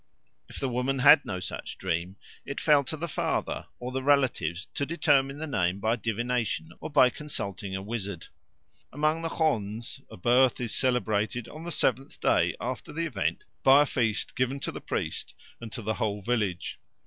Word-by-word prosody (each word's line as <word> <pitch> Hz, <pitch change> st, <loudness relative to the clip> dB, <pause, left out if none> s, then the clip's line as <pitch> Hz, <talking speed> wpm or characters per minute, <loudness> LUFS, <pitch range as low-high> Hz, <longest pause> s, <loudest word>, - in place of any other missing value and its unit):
If -, -, -8 dB
the 135 Hz, -, 0 dB
woman 125 Hz, +2 st, 0 dB
had 145 Hz, +3 st, +8 dB
no 95 Hz, -2 st, -3 dB
such 90 Hz, -, -6 dB
dream, 90 Hz, 0 st, -2 dB, 0.3 s
it 140 Hz, -, -5 dB
fell 150 Hz, -2 st, +5 dB
to 155 Hz, -, -4 dB
the 170 Hz, +3 st, -3 dB
father 150 Hz, -, -2 dB
or 125 Hz, +1 st, -5 dB
the 130 Hz, +1 st, -2 dB
relatives 130 Hz, -, +2 dB
to -, -, -1 dB
determine 145 Hz, -3 st, +2 dB
the 155 Hz, -, -4 dB
name 95 Hz, -, 0 dB
by 110 Hz, +3 st, +2 dB
divination 115 Hz, -6 st, -1 dB
or -, -, -5 dB
by 135 Hz, -4 st, +5 dB
consulting 100 Hz, -10 st, -5 dB
a 95 Hz, -, -4 dB
wizard. 100 Hz, -5 st, -4 dB, 0.7 s
Among 155 Hz, +3 st, +1 dB
the 165 Hz, -, -2 dB
Khonds 125 Hz, -2 st, -1 dB
a -, -, -10 dB
birth 125 Hz, +6 st, +4 dB
is 120 Hz, -3 st, -2 dB
celebrated 120 Hz, -2 st, 0 dB
on 155 Hz, +2 st, -9 dB
the 175 Hz, -, -4 dB
seventh 135 Hz, -2 st, 0 dB
day -, -, +3 dB
after -, -, -4 dB
the 165 Hz, +2 st, -2 dB
event 120 Hz, -12 st, -1 dB, 0.2 s
by 135 Hz, +2 st, +7 dB
a -, -, -1 dB
feast 115 Hz, -6 st, -1 dB
given 130 Hz, +2 st, 0 dB
to -, -, -2 dB
the -, -, -7 dB
priest -, -, -3 dB, 0.2 s
and 115 Hz, -2 st, -8 dB
to 115 Hz, -, -6 dB
the 110 Hz, -, 0 dB
whole 105 Hz, -2 st, -2 dB
village. 105 Hz, -6 st, -1 dB
125 Hz, 185 wpm, -28 LUFS, 105-140 Hz, 0.7 s, had